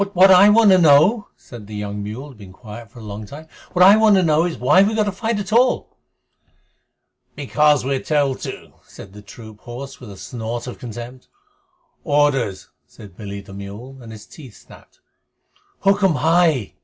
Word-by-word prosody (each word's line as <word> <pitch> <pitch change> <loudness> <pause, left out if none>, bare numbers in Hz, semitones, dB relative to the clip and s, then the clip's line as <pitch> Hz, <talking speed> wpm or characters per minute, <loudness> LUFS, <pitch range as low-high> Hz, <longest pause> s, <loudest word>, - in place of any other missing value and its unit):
"What 190 +2 +6
I 190 +2 +7
want 215 -1 +5
to 185 - +5
know," 170 +8 +4
said 115 -5 -13
the 105 - -9
young 105 0 -5
mule, 105 +6 -7
who 145 - -12
had 130 - -16
been 95 -2 -13
quiet 110 +2 -12
for 120 - -19
a 115 - -11
long 105 0 -8
time 155 +6 -12 0.3
"what 180 0 +5
I 200 +2 +8
want 220 -2 +4
to 190 - +2
know 160 0 +2
is, 175 - -4
why 145 +9 +3
we 210 +3 +1
have 215 -1 +1
to 205 - -2
fight 225 +3 -3
at 205 0 -5
all." 250 +2 +1 1.4
"Because 145 -1 +1
we're 135 0 -1
told 145 -3 -1
to," - - -9
said 95 - -15
the 105 - -12
troop 110 +1 -14
horse, 130 +4 -10
with 125 - -12
a 100 - -12
snort 115 +3 -6
of 125 - -9
contempt. 120 +2 -10 0.8
"Orders," 145 - 0 0.2
said 100 -4 -16
Billy 100 -1 -8
the 95 0 -15
mule, 105 +7 -10
and 115 -2 -12
his 110 -1 -12
teeth 135 -8 -14
snapped. - - -19 0.8
"Hukm 195 -3 +2
hai!" 160 - +1
135 Hz, 190 wpm, -19 LUFS, 110-180 Hz, 1.4 s, I